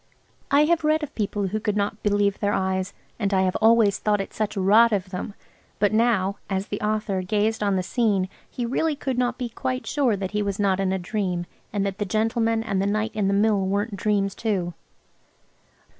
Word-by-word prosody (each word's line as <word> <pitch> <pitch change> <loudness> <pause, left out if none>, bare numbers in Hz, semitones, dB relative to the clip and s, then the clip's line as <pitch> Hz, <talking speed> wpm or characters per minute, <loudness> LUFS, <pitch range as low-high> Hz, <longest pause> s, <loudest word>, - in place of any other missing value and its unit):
I 285 +1 +5
have 335 0 +2
read 310 +1 +2
of 295 - -5
people 205 -2 -2
who 215 +3 -2
could 210 -1 -1
not 205 +1 -1
believe 205 -1 +1
their 205 -1 0
eyes; 190 0 -1 0.2
and 200 -3 0
I 190 - +3
have 185 -1 0
always 220 -3 +4
thought 210 -1 +1
it 195 - -5
such 215 -1 -2
rot 215 +5 +5
of 190 -3 -1
them, 200 +2 -5 0.4
but 205 0 +2
now, 215 -4 +2
as 195 0 -2
the 205 - -4
author 210 -2 -1
gazed 210 +4 0
on 200 -2 +1
the 185 - 0
scene, 205 -3 +1 0.2
he 245 - -4
really 300 +6 0
could 265 -3 -2
not 245 -1 0
be 250 - -3
quite 255 +2 -3
sure 270 -7 +1
that 190 -1 -4
he 210 0 0
was 200 -1 -2
not 195 -2 +2
in 190 -1 +1
a 190 - 0
dream, 180 -2 -2 0.3
and 200 -1 -1
that 195 0 -3
the 205 - 0
gentleman 225 +2 +1
and 200 -4 -1
the 195 - 0
night 215 +2 0
in 210 -2 0
the 195 - +2
Mill 205 0 +3
weren't 200 +3 -1
dreams 200 -1 0
too. 190 -6 -2
205 Hz, 215 wpm, -24 LUFS, 195-225 Hz, 0.4 s, I